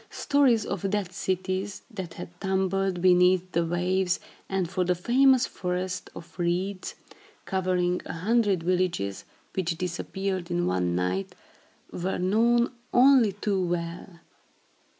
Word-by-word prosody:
Stories 270 -6 +2
of 195 - -2
dead 200 -3 -1
cities, 185 +2 -3
that 185 -6 -7
had - - -7
tumbled 190 -1 0
beneath 180 0 +4
the 170 0 +1
waves, 180 +2 0 0.3
and 190 -2 0
of 180 -2 +1
the 180 - +2
famous 255 +7 +4
Forest 180 0 -3
of 170 +1 -12
Reeds, 185 +3 -2 0.5
covering 180 -1 0
a - - -5
hundred 200 0 +1
villages, 175 - -1 0.3
which 175 -3 -1
disappeared 185 +1 -3
in 175 0 0
one 90 -1 0
night, 90 +2 -2 0.6
were 185 +2 -2
known 230 +6 +2 0.2
only 250 -5 +5
too 200 -1 -1
well. 170 0 -3
185 Hz, 125 wpm, -27 LUFS, 175-195 Hz, 0.6 s, only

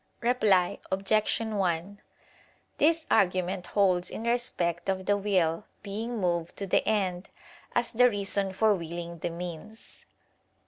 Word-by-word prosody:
Reply 210 -7 +2
Obj. 200 +3 +1
1: 200 -3 -2 0.8
This 325 +1 +3
argument 180 0 +1
holds 185 -2 +2
in - - -6
respect 195 -8 0
of 190 -1 -1
the 205 - +3
will 190 -3 0 0.2
being 225 +4 -4
moved 170 -3 -1
to 200 - -2
the 190 - +2
end 190 -4 0 0.5
as 240 0 +2
the 250 +2 +5
reason 200 -2 0
for 215 +3 +3
willing 170 -1 -6
the 175 - -2
means. 175 +5 -9
195 Hz, 130 wpm, -28 LUFS, 175-215 Hz, 0.8 s, the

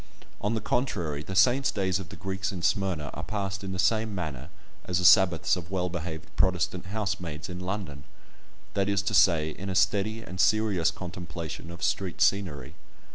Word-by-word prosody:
On 105 +3 0
the 110 - -2
contrary, 85 - -1
the 95 +5 -6
saints' 125 +8 +4
days 95 -2 0
of 90 -5 -8
the - - -9
Greeks 95 0 -3
in 90 -3 -6
Smyrna 90 - 0
are - - -5
passed 100 -1 -3
in 95 - -4
the 95 - -3
same 110 +3 +1
manner 75 -5 -5 0.4
as 90 - 0
the 90 - 0
Sabbaths 90 -3 +6
of 85 -2 -7
well 90 -1 -1
behaved 80 -2 -6
Protestant 90 0 +1
housemaids 95 -6 -3
in 90 0 -6
London—that 95 +2 -6
is 100 0 +1
to 105 - -1
say, 80 -4 +4
in 95 +5 -6
a 95 - -2
steady 105 +3 +1
and 90 -2 -3
serious 100 -4 +3
contemplation 85 -2 -6
of 85 0 -8
street 95 -3 -1
scenery. 75 -9 +1
95 Hz, 180 wpm, -28 LUFS, 85-100 Hz, 0.4 s, Sabbaths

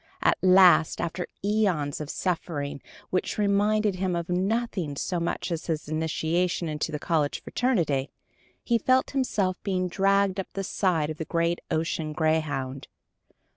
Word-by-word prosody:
At - - +3
last, 185 -3 +6
after 170 +1 -3 0.2
æons 185 -10 +1
of 150 - -6
suffering 160 -6 -3 0.3
which 185 - -1
reminded 210 0 +2
him 185 -1 -1
of 170 0 -3
nothing 185 -4 -1
so 175 +5 -2
much 170 +2 -2
as 170 0 -3
his 155 -3 -2
initiation 160 +3 0
into 155 +1 -2
the 150 - -2
college 150 -2 -1
fraternity, 165 - 0 0.5
he 235 -1 +2
felt 255 +3 +2
himself 205 -9 0
being 185 -2 -1
dragged 195 +1 +2
up 190 - -3
the 195 - -3
side 170 -6 0
of 155 - -8
the 160 - -3
great 170 +1 0
ocean 160 -1 -1
greyhound. 150 -4 -1
175 Hz, 145 wpm, -26 LUFS, 155-195 Hz, 0.5 s, last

